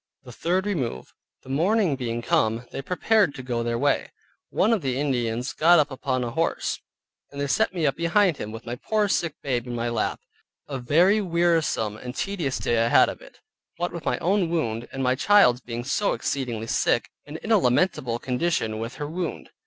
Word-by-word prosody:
THE 125 - -11
THIRD 180 - -1
REMOVE 130 - -3 0.3
The - - -14
morning 175 +3 +2
being 120 -2 -3
come, 115 +2 +1
they - - -4
prepared 185 +3 +2
to 130 - -7
go 120 -2 -2
on 115 - -2
their 120 0 0
way. 140 +2 +1 0.4
One 220 +4 +2
of 215 - +1
the 130 -2 -1
Indians 125 -3 -1
got 170 +3 +5
up 150 -2 +2
upon 130 -1 -2
a 120 - -3
horse, 165 +6 -1 0.5
and 140 - -8
they 140 - 0
set 140 - +1
me 175 -4 -1
up 140 -1 +1
behind 170 0 +2
him, 105 - -5
with 115 +1 -9
my 120 - -4
poor 215 - 0
sick 170 -5 0
babe 125 -3 -1
in 120 - -4
my 120 0 -1
lap. 115 -2 -1 0.5
A 135 -3 -4
very 175 - +4
wearisome 165 - +1
and 125 +2 -8
tedious 175 -9 -2
day 115 -1 +1
I - - +2
had - - +5
of - - -8
it; - - -16 0.4
what 175 +1 -2
with 170 - -6
my - - 0
own 190 -1 +1
wound, 120 -9 -2
and 135 - -3
my 125 0 +3
child's 130 -5 +4
being 120 0 -5
so 170 +10 0
exceeding 120 -5 -3
sick, 115 - +1 0.2
and 150 +2 -6
in 220 - -5
a 220 - +6
lamentable 125 -4 +1
condition 125 -4 -1
with 115 +2 -5
her 145 - -4
wound. 170 +2 -5
140 Hz, 205 wpm, -25 LUFS, 120-175 Hz, 0.5 s, a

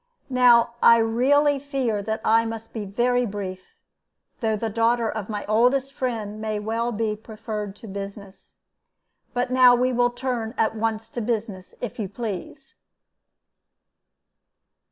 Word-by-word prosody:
"Now 240 -2 +5
I 230 - +8
really 275 +6 +3
fear 265 -7 -1
that 220 +2 -3
I 225 +1 +4
must 225 0 -6
be 220 -3 -4
very 245 +5 +1
brief, 195 -4 -6 0.6
though 220 -3 0
the 225 - -2
daughter 230 +1 +1
of 215 -2 -4
my 210 -1 -4
oldest 250 +5 +2
friend 220 -6 -3
may 215 -1 -2
well 225 +3 -2
be 220 -1 -1
preferred 215 -2 -6
to 225 - -12
business. 200 0 -9 0.7
But 245 +1 0
now 255 -1 +7
we 250 +1 +1
will 245 0 +3
turn 245 -2 -3
at 220 - +1
once 225 0 -2
to 240 - -4
business, 215 -4 -3
if 245 -1 -5
you 200 -3 -3
please." 230 +6 -6
225 Hz, 140 wpm, -24 LUFS, 215-245 Hz, 0.7 s, I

